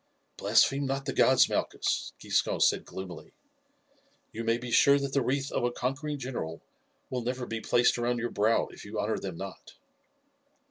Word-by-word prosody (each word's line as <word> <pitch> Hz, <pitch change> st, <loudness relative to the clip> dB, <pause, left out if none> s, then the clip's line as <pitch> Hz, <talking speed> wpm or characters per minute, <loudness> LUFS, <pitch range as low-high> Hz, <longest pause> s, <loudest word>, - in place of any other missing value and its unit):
"Blaspheme 140 Hz, 0 st, +3 dB
not 135 Hz, 0 st, -2 dB
the -, -, -2 dB
gods, -, -, +5 dB
Malchus," -, -, -1 dB
Giscon -, -, 0 dB
said -, -, +3 dB
gloomily; 95 Hz, -3 st, -9 dB, 1.0 s
"you 115 Hz, -, -5 dB
may 115 Hz, 0 st, +2 dB
be 120 Hz, 0 st, -7 dB
sure 140 Hz, +4 st, +6 dB
that 140 Hz, -1 st, -3 dB
the 140 Hz, -, +3 dB
wreath 135 Hz, +2 st, -1 dB
of -, -, -1 dB
a 120 Hz, -, +2 dB
conquering 135 Hz, +5 st, -3 dB
general 120 Hz, -, -5 dB, 0.5 s
will 125 Hz, -1 st, -1 dB
never 125 Hz, +1 st, -3 dB
be 110 Hz, -1 st, -4 dB
placed 120 Hz, +1 st, +3 dB
around 120 Hz, +1 st, 0 dB
your 120 Hz, 0 st, -3 dB
brow 110 Hz, +3 st, +2 dB
if -, -, -12 dB
you 105 Hz, +1 st, -5 dB
honour 110 Hz, +1 st, -1 dB
them 95 Hz, -4 st, -6 dB
not." 95 Hz, -1 st, -9 dB
120 Hz, 175 wpm, -29 LUFS, 110-135 Hz, 1.0 s, sure